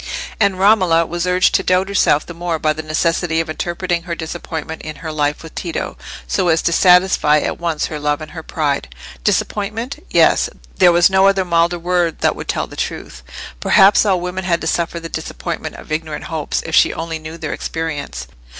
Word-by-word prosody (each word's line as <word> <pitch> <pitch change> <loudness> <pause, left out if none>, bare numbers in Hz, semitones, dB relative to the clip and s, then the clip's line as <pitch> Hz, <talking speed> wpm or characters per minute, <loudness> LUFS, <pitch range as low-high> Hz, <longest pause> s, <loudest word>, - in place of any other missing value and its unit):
And 200 -3 +2
Romola 185 -5 +4
was 175 +2 -3
urged 180 +1 +3
to - - +3
doubt 185 +1 +2
herself 195 -7 +2
the 170 - -8
more 170 -1 -2
by 155 0 +1
the 155 - -5
necessity 160 +1 0
of 165 -1 -2
interpreting 175 +1 -2
her 170 0 -5
disappointment 160 -1 -6
in 155 0 -7
her 160 - -3
life 150 0 -1
with 160 - -11
Tito 170 -3 -4 0.3
so 185 -2 0
as 160 -1 +2
to - - +2
satisfy 180 -4 +5
at - - -2
once 165 -3 -1
her 155 - -5
love 150 0 0
and 155 0 -9
her 165 - -7
pride. 150 -3 -2 0.3
Disappointment? 215 +5 -2
Yes, - - +4 0.3
there 180 -2 +6
was 175 +2 +4
no 190 0 +5
other 195 -1 +2
milder 170 0 +2
word 175 -1 0
that - - +2
would - - -8
tell - - -1
the - - -12
truth. 65 - -5 0.4
Perhaps 195 - +5
all 195 -4 +2
women 180 +2 -4
had 175 -2 +1
to - - -4
suffer 170 +1 -1
the 165 - -7
disappointment - - -5
of - - -12
ignorant 155 -1 -3
hopes, 160 -3 -3
if 160 - -6
she - - +5
only 165 -1 -4
knew 155 +1 -8
their - - -4
experience. 160 -3 -4
170 Hz, 200 wpm, -18 LUFS, 160-180 Hz, 0.4 s, there